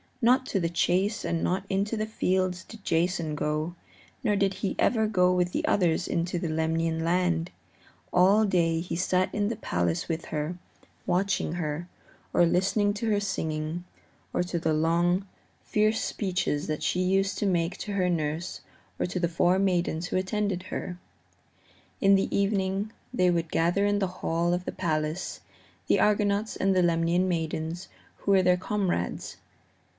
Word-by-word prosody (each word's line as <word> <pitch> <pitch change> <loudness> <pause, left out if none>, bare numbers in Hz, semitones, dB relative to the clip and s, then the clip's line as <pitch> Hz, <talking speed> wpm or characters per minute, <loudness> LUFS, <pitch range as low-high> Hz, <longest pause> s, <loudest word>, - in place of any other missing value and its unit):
Not 255 +2 +3
to 195 - 0
the 170 -2 0
chase 185 +5 +1
and 165 -1 -1
not 185 +2 0
into 200 +3 0
the 215 - -1
fields 185 -3 0
did 225 -3 -13
Jason 170 -2 0
go, 155 +3 -2 0.5
nor 210 -4 +2
did 195 -1 +1
he 195 +1 -2
ever 220 -3 +2
go 180 -4 +3
with 180 -1 +1
the - - -1
others 175 -5 +2
into 170 +1 -1
the 170 - -2
Lemnian 160 +1 0
land; 175 0 +1 0.6
all 195 +5 +5
day 165 -4 +2
he 175 - -4
sat 180 +1 +1
in 205 -1 +1
the 230 - -2
palace 85 - -1
with 165 0 -3
her, 155 +3 -3 0.5
watching 185 -2 +1
her, 165 0 -3 0.5
or 175 - +5
listening 200 +4 +2
to 225 +2 -2
her 205 -1 +2
singing, 160 -4 -3 0.5
or - - +1
to 175 -1 -3
the 160 -1 +1
long, 170 +4 +2 0.4
fierce 215 +1 +1
speeches 180 -7 -1
that 155 -1 -3
she 180 - 0
used 195 +1 +1
to - - 0
make 175 -1 0
to 205 - -5
her 185 -2 +1
nurse 160 0 -2 0.4
or - - +1
to 180 +1 -3
the 170 -1 +1
four 175 +2 +2
maidens 175 -3 0
who - - -1
attended 190 -1 -1
her. 180 -1 -5 1.0
In 195 -1 +5
the 195 - 0
evening 200 +1 0 0.2
they 180 -7 +3
would 170 -2 0
gather 175 +5 +2
in 205 0 +1
the 195 - +1
hall 170 +1 +1
of 180 +1 -2
the - - -3
palace, 155 +1 -2 0.5
the - - +3
Argonauts 210 0 +2
and 195 0 +1
the 180 - +4
Lemnian 170 +2 +2
maidens 165 +1 -2 0.3
who 200 - -1
were 190 -1 +5
their 180 0 +4
comrades. 185 - -2
180 Hz, 170 wpm, -27 LUFS, 165-195 Hz, 1.0 s, all